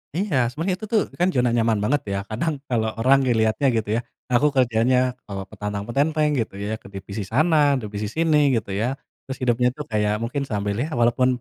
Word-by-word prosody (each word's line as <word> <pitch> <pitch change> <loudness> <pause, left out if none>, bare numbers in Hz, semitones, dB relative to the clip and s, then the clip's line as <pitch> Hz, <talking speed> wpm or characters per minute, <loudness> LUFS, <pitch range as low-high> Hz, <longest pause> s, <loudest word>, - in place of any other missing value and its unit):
Iya 155 - +1
sebenernya 165 +8 -2
itu 215 - -6
tuh 215 - +5 0.2
kan 180 - +3
zona 125 -1 +3
nyaman 115 -2 +2
banget 140 +6 +1
ya, - - -1
kadang 150 +9 -1 0.2
kalau 110 -3 +1
orang 135 +4 +5
ngeliatnya 110 +3 +2
gitu 110 -2 -1
ya, - - -4 0.3
aku 140 +5 +4
kerjanya 125 0 +3 0.3
kalau 100 -1 -5
petantang-petenteng 135 +10 -1
gitu 110 - -2
ya 110 - -2
ke - - -15
divisi 100 +2 -6
sana, 150 +2 +3
divisi 105 0 -4
sini 160 -2 +3 0.2
gitu 105 -3 -3
ya, 115 +7 -1 0.3
terus 135 - -5
hidupnya 125 0 +2
tuh 150 - -5
kayak 105 -1 +1
mungkin 140 +3 -3
sambil 105 -2 -2
ya 145 - 0
walaupun 120 +2 +3
120 Hz, 190 wpm, -23 LUFS, 110-145 Hz, 0.3 s, tuh